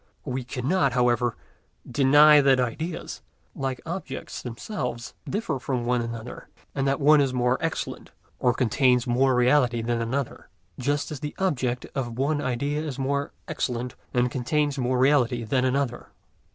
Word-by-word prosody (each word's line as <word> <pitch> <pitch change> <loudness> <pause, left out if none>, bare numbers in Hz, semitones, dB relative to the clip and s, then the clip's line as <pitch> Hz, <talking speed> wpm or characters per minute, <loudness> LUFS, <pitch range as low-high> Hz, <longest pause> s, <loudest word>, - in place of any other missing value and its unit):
We 130 -2 -3
cannot, 130 +4 0
however, 120 -1 +2 0.5
deny 145 +4 +6
that 135 -2 +4
ideas, 155 +8 -3 0.3
like 135 -2 -3
objects 170 -5 -5
themselves, 120 - -5 0.2
differ 185 - -2
from 125 -1 -2
one 120 0 +1
another, 115 0 -7 0.3
and 135 -1 -1
that 135 +1 +1
one 150 +1 +6
is 135 -2 0
more 125 +1 +1
excellent 165 -1 -3 0.3
and 125 -1 +2
contains 125 0 +3
more 130 +2 +2
reality 125 -2 +3
than 120 0 -1
another, 130 +3 -3 0.3
just 145 +4 -1
as 150 - -5
the 150 +2 -5
object 130 -10 -1
of 120 -3 -3
one 145 +3 0
idea 140 +4 -1
is 150 -4 -5
more 140 +1 -1 0.2
excellent 125 0 -3 0.2
and 125 0 +1
contains 145 +3 0
more 125 0 +1
reality 125 -3 +3
than 130 +3 +1
another. 130 -2 -1
130 Hz, 150 wpm, -25 LUFS, 120-145 Hz, 0.5 s, deny